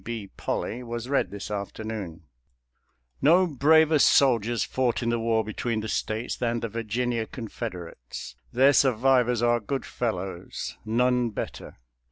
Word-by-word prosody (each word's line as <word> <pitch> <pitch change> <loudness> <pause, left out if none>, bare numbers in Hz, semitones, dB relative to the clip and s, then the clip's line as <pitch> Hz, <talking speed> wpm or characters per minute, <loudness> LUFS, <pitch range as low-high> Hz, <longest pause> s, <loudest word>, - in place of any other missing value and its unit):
B. 110 -4 -6
Polley 120 - -3
was 120 +1 -5
read 140 - +1
this 100 +1 -7
afternoon: 100 -3 -5 1.0
No 170 +7 +5
braver 155 +1 +4
soldiers 120 -5 +4
fought 125 -2 0
in 115 - 0
the 120 0 +1
war 115 -1 +1
between 110 +1 -2
the 110 - -5
States 110 +2 -2
than 120 -1 -1
the 115 - -3
Virginia 115 +1 -2
Confederates; 85 - -7 0.2
their 135 +4 +5
survivors 125 -2 +3
are 120 0 +3
good 130 +5 -3
fellows 95 -6 -4
— - - -32
none 125 +2 +2
better. 105 - -6
115 Hz, 140 wpm, -26 LUFS, 110-125 Hz, 1.0 s, No